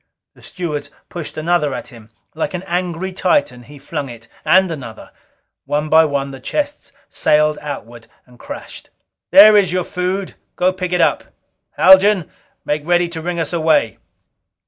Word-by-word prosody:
The - - -21
stewards 150 -5 -5 0.2
pushed 170 -4 -7
another 155 -3 0
at - - -7
him. 115 -4 -15 0.2
Like 160 +3 -3
an 180 - -5
angry 180 +1 -3
Titan, 185 - 0
he 145 +5 -14
flung 140 0 -5
it. 115 -1 -12 0.2
And 185 -1 +4
another. 125 -8 -9 0.5
One 150 +1 -2
by 160 +1 +6
one 140 -2 -2
the 135 - -10
chests 290 - -4 0.2
sailed 150 0 +2
out 120 -6 -8 0.2
and 125 -1 -21
crashed. - - -10 0.4
"There 210 +3 +8
is 195 -4 +4
your 180 0 0
food. 185 +1 -3 0.2
Go 185 +1 +1
pick 185 -1 -4
it 180 -1 +1
up! 155 -4 +1 0.5
Haljan, 190 -2 +5 0.3
make 150 0 -1
ready 175 +1 +1
to 165 -1 -6
ring 175 +1 -3
us 165 +1 -3
away!" 160 -8 +1
165 Hz, 160 wpm, -18 LUFS, 145-180 Hz, 0.5 s, There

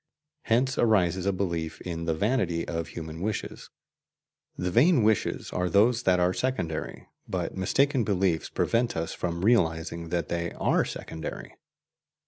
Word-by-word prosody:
Hence 130 +4 +1
arises 95 -5 +2
a - - +4
belief 85 -4 -3
in 85 -2 -4
the 80 -1 0
vanity 95 -4 0
of 85 -1 -3
human 80 0 -7
wishes: 105 +1 -4 0.9
the 90 0 -2
vain 135 - +5
wishes 110 -1 0
are 90 0 0
those 115 +5 +4
that 90 -5 +3
are 90 +1 +2
secondary, 90 -12 -3 0.2
but 90 -2 -3
mistaken 130 - +2
beliefs 95 -5 0
prevent 115 -2 0
us 80 0 -2
from 85 +1 -3
realizing 85 -6 +1
that 85 -3 -1
they 85 0 -2
are - - +2
secondary. 80 0 -7
90 Hz, 140 wpm, -27 LUFS, 85-110 Hz, 0.9 s, vain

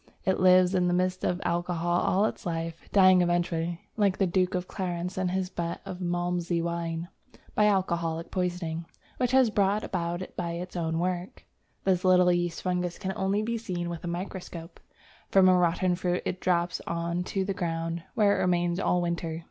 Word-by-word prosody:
It 190 - +1
lives 185 0 +5
in 180 -1 +2
the 175 - +2
midst 185 0 0
of 180 - 0
alcohol 175 0 0
all 195 +3 +2
its - - -3
life, 165 -1 -4
dying 185 -2 +6
eventually 175 -1 0 0.2
(like 200 -3 +2
the 195 - +3
Duke 185 +1 +1
of 180 0 -2
Clarence 180 -1 -3
in 185 -1 0
his 185 0 -1
butt 170 0 -3
of 180 - -6
Malmsey 175 -1 -1
wine) 170 0 -3 0.5
by 210 - +3
alcoholic 170 -5 0
poisoning, 175 -3 -2 0.3
which 250 -1 +1
it 260 - +5
has 255 -3 +5
brought 205 +1 +2
about 175 -1 -3
by 170 -1 -3
its 180 +2 -6
own 165 -2 -1
work. 180 +1 -3 0.4
This 185 -2 +2
little 180 -1 +5
yeast 175 -1 -1
fungus 180 -1 -1
can 190 -1 -3
only 195 +2 0
be 230 +1 -2
seen 175 -5 -3
with 170 - -6
a - - -4
microscope. 175 -1 -6 0.5
From 190 -1 +6
a 185 - +6
rotten 180 +1 +2
fruit 180 0 -1
it 180 - -2
drops 175 -1 +1
on 170 +1 -1
to 190 0 -1
the 195 - -1
ground, 165 -1 -2
where 205 -3 +4
it - - +1
remains 175 0 +1
all 180 -2 +1
winter. 170 -1 -2
180 Hz, 190 wpm, -28 LUFS, 170-185 Hz, 0.5 s, dying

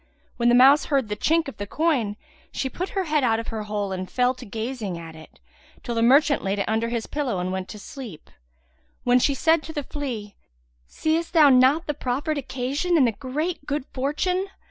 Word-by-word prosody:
When 240 0 +3
the 240 - +5
mouse 270 +4 +6
heard 270 -7 0
the 210 - -2
chink 325 +8 +1
of 275 - -8
the 205 - -5
coin, 265 -8 0 0.4
she 265 - -2
put 370 +2 -4
her 385 - +2
head 305 -4 +1
out 225 -2 +2
of 230 - -6
her 220 -2 -4
hole 205 -2 -3
and 185 0 -4
fell 250 0 +2
to 255 - -12
gazing 220 -3 -4
at 165 -1 -9
it, 160 0 -15 0.4
till 240 - -3
the 230 - 0
merchant 280 +5 +4
laid 195 +1 -1
it 200 - -1
under 225 +1 0
his 235 -2 -2
pillow 280 -9 -2
and 180 +1 -2
went 190 0 -4
to 215 - -8
sleep, 215 - -10 0.7
when 245 0 +4
she 280 +2 +2
said 320 +3 +3
to 320 - -9
the 295 -2 -3
flea, 240 -9 -5 0.5
"Seest 325 - -1
thou 310 -4 +7
not 265 +5 +5
the 295 - -1
proffered 285 +3 -2
occasion 280 +7 -1
and 275 - +5
the 235 - +2
great 285 - -4
good 290 -2 -2
fortune? 360 +8 -1
255 Hz, 210 wpm, -24 LUFS, 220-300 Hz, 0.7 s, thou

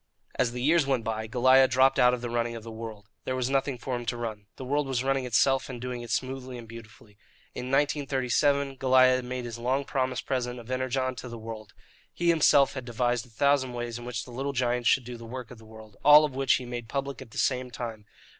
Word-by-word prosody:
As 120 - 0
the 125 0 -5
years 155 0 +3
went 130 -4 +1
by, 110 -1 -3
Goliah 130 +3 +5
dropped 135 +1 +4
out 125 0 +6
of 125 -1 -3
the 120 - -4
running 120 0 -1
of 115 - -8
the 115 - -8
world. 110 -2 -8 0.2
There 130 - -2
was 130 0 -1
nothing 135 -1 0
for 125 +1 -4
him 120 - -4
to 120 - -1
run. 110 -4 -5
The 130 - -8
world 145 +2 0
was 130 -2 -1
running 135 -1 0
itself, 130 +3 +2
and 125 -2 -6
doing 125 0 -5
it 120 - -9
smoothly 130 -1 -3
and 115 -1 -10
beautifully. 115 -1 -13 0.3
In 125 - -5
1937, 140 0 +1
Goliah 130 -1 +4
made 125 0 -5
his 120 -1 -6
long 130 +4 0
promised 130 -2 -2
present 125 -2 -2
of 120 +1 -10
Energon 130 0 -1
to 125 - -7
the 120 - -7
world. 110 -1 -9 0.4
He 175 0 0
himself 145 -4 +5
had 130 - -5
devised 120 0 -1
a - - -21
thousand 130 +2 +1
ways 120 -1 -4
in 120 - -9
which 120 -2 -4
the 125 - -12
little 135 +3 -3
giant 125 -2 0
should 130 - +4
do 120 0 -8
the 115 - -11
work 125 0 -7
of 120 - -11
the 110 - -15
world 110 -1 -14
all 150 +1 +8
of 145 - -5
which 135 +1 +2
he 125 - -4
made 120 -1 -6
public 140 0 -3
at - - -10
the - - -12
same 130 -1 0
time. 115 -3 -7
125 Hz, 240 wpm, -27 LUFS, 120-135 Hz, 0.4 s, all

